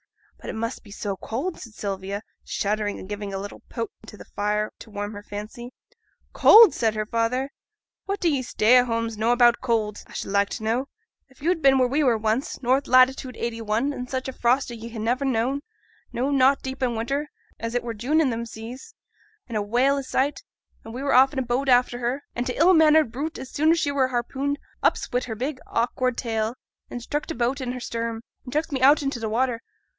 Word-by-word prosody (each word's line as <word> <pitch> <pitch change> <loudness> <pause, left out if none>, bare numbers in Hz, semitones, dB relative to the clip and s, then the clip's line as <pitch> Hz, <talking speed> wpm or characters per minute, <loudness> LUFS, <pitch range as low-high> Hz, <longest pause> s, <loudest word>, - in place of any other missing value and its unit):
'But - - -8
it - - -3
must 230 +2 -4
be 210 - -16
so 200 -1 -4
cold,' 275 - -4
said 230 -4 -11
Sylvia, 200 +1 -4 0.2
shuddering 210 0 -1
and - - -9
giving 205 0 -5
a 195 - -3
little 200 +1 -7
poke 230 -3 -4 0.2
to 210 - -11
the - - -12
fire 210 +1 -1
to - - -12
warm 205 0 -5
her 205 - -8
fancy. 210 +4 -8 0.6
'Cold!' 440 -4 +8
said 220 -2 0
her 215 0 -1
father, 235 +5 -1 0.5
'what 395 0 -2
do 350 - +1
ye 285 -5 +2
stay 240 -1 +4
at 250 0 +4
homes 230 -1 -1
know 225 +2 +2
about 240 -1 +4
cold, 220 -4 -1
a - - -14
should - - -4
like 200 0 +2
to - - -6
know? 235 +5 0 0.4
If 265 0 -20
yo'd 340 0 +1
been 270 -1 +5
where 255 -1 +4
a 305 - +3
were 235 -2 +4
once, 220 +6 -2
north 260 +3 +2
latitude 255 0 +4
81, 230 +3 -1
in 250 -2 -6
such 260 0 -3
a 265 - -4
frost 250 +1 +1
as 235 - -7
ye 230 +1 -8
ha' 230 - -9
niver 245 +5 0
known, 260 +2 0 0.5
no, 260 +4 -1
not 275 0 +5
i' - - -30
deep 265 0 -5
winter, 255 +4 -1 0.3
and 230 +1 -4
it 245 - 0
were 235 -1 -4
June 255 +9 +1
i' 315 - +3
them 235 -1 -2
seas, 240 - -9 0.5
and 235 - -6
a 210 - +1
whale 245 +7 +2
i' - - -1
sight, 275 - -1 0.4
and 225 - -9
a - - -4
were 275 +1 -1
off 265 +2 +6
in - - -7
a 265 - +1
boat 250 +3 -1
after 245 -1 +3
her: 250 +4 -2
an' 245 - -2
t' 250 - -2
ill 345 +5 +5
mannered 315 -5 +5
brute, 295 +7 -4
as 260 0 -8
soon 310 +2 +2
as 335 - +5
she 290 -2 0
were 270 -2 +2
harpooned, 265 +3 -2 0.2
ups - - +1
wi' 245 - +3
her 230 -3 -5
big 260 +4 -3
awkward 250 +1 0
tail, 225 -1 -1 0.3
and 245 - -6
struck 295 +4 -3
t' 325 - -4
boat 250 +3 0
i' 255 - -3
her 250 0 -4
stern, 230 -1 -4 0.2
and 250 - -9
chucks 305 +3 -1
me 265 -2 -2
out 285 +3 +6
into 275 -3 -2
t' 225 - -3
watter. 235 +1 0
245 Hz, 230 wpm, -24 LUFS, 225-270 Hz, 0.6 s, Cold